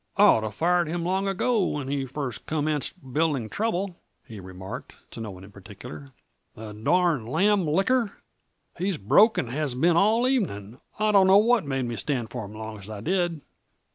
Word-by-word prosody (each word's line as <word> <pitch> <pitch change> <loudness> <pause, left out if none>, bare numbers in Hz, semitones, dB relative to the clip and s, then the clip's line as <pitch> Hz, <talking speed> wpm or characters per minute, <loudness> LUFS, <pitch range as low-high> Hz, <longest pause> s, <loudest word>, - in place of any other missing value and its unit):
"I'd - - +6
oughta 110 -1 +5
fired 170 - +1
him 170 +2 -3
long 190 +3 0
ago, 205 +3 +1
when 150 -6 -2
he 135 -1 -2
first 130 -3 -5
commenced 150 -2 -3
building 145 -7 0
trouble," 195 - -2 0.3
he 110 -3 -10
remarked, 95 0 -9 0.2
to - - -8
no 110 - -5
one 95 -1 -10
in 100 - -13
particular. 75 -7 -11 0.4
"The 110 -1 -8
darned 150 - +1
lamb 195 +4 +2
licker 200 +8 +2 0.7
he's 185 -1 -1
broke 210 - +4
and 120 - -2
has 145 -2 -2
been 165 +6 +3
all 220 +6 +3
evening. 125 - -2 0.2
I 215 0 +2
don't 195 -2 +5
know 190 +1 +7
what 225 -5 +3
made 135 -2 -1
me 120 -1 -4
stand 120 -6 -2
for 110 - -5
'im 100 - -10
long 110 0 -7
as 100 +1 -10
I 105 -2 -7
did." 175 - -1
150 Hz, 185 wpm, -26 LUFS, -, 0.7 s, know